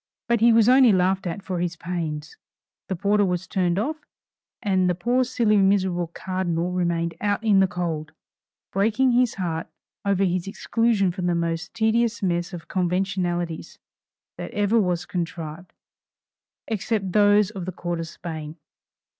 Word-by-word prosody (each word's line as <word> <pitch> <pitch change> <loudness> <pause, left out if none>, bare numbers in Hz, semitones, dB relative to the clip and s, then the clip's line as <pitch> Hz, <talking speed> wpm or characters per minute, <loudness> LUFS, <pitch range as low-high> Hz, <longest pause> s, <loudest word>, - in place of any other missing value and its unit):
But 235 -1 +2
he 235 +2 +6
was 225 -1 +5
only 255 -1 +7
laughed 190 0 +1
at 175 +3 -5
for 185 -2 -3
his 175 0 -2
pains; 160 -3 -4 0.5
the 190 - -1
porter 205 +3 +2
was 180 -1 -1
turned 180 -2 0
off, 295 +10 -1 0.7
and 190 -3 +2
the 180 - +1
poor 245 +8 +1
silly 235 -4 +2
miserable 190 -3 +2
cardinal 180 0 -2
remained 170 -2 0
"out 205 +1 0
in 210 -3 +4
the 190 - +5
cold," 170 -5 -3 0.6
breaking 225 +6 +2
his 245 -1 +2
heart 170 -4 -3 0.4
over 200 -1 +1
his 185 -1 0
exclusion 210 -1 +1
from 180 0 -3
the 175 - +1
most 165 +1 -2
tedious 225 0 +1
mess 175 -1 0
of 175 -3 -8
conventionalities 180 -2 -2 0.6
that - - -5
ever 205 +2 +3
was 180 -3 0
contrived 170 -1 -5 1.0
except 210 -2 -1
those 205 0 +4
of 190 -5 -6
the 185 - -3
court 175 -1 -4
of 165 - -4
Spain. 160 -2 -7
185 Hz, 155 wpm, -24 LUFS, 175-205 Hz, 1.0 s, only